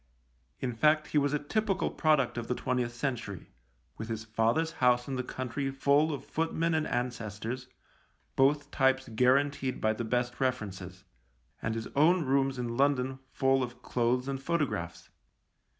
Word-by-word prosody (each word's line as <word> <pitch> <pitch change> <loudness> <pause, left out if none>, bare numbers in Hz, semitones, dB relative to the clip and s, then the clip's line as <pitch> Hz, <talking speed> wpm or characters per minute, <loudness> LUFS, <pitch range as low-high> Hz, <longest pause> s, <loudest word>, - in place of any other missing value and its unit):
In 125 -2 -2
fact, 150 +5 +3
he 150 - +3
was 145 -1 +1
a 150 - +2
typical 195 +6 -1
product 150 -6 +2
of 120 -1 -4
the 125 - -1
twentieth 125 -2 -1
century 115 - -4 0.2
— - - -41
with 110 +1 -5
his 110 -1 -3
father's 115 +9 +1
house 125 -1 +4
in 135 - -3
the 130 - -1
country 130 +2 -3
full 140 +3 +3
of 140 -2 -5
footmen 165 +1 -1
and 155 -1 +1
ancestors, 120 0 -3 0.7
both 145 +2 +2
types 130 -1 +2
guaranteed 130 +3 +2
by 110 0 +2
the 120 - -4
best 120 +2 -1
references 100 -8 -3 0.3
— 65 +5 -39
and 110 - -2
his 115 0 -3
own 160 +3 +4
rooms 135 0 +1
in 120 -1 -3
London 135 -1 +1
full 135 -1 +2
of 125 0 -5
clothes 125 +2 0
and 135 -1 -3
photographs. 135 - -2
130 Hz, 165 wpm, -30 LUFS, 115-145 Hz, 0.7 s, house